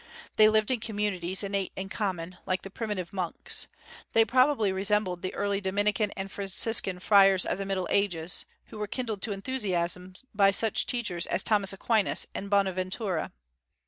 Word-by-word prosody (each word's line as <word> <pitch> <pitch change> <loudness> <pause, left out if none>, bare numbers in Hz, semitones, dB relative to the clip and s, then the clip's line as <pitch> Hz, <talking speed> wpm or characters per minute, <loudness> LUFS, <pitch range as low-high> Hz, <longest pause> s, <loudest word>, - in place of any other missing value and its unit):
They 215 0 +7
lived 215 +2 +2
in 250 - 0
communities 205 -4 -1
and 200 0 -3
ate 195 -2 -1
in 190 - -5
common, 185 -4 -4
like 185 0 -1
the 195 - -9
primitive 205 -4 -4
monks. 180 -4 -2 0.5
They 225 0 +5
probably 255 -3 +3
resembled 190 -2 0
the 185 - -3
early 200 0 -1
Dominican 205 +2 +1
and 195 0 -5
Franciscan 195 -1 +2
friars 195 0 +5
of 180 - -2
the 195 - -4
Middle 190 -2 -1
Ages, 180 -4 0 0.2
who 215 - -9
were 210 - -2
kindled 230 -3 -4
to 220 - -3
enthusiasm 185 -5 -2 0.2
by 200 -1 +5
such 210 +2 +2
teachers 205 -9 -1
as - - 0
Thomas 205 -3 +2
Aquinas 210 +1 +2
and 200 - -5
Bonaventura. 190 -2 -1
195 Hz, 165 wpm, -28 LUFS, 185-210 Hz, 0.5 s, They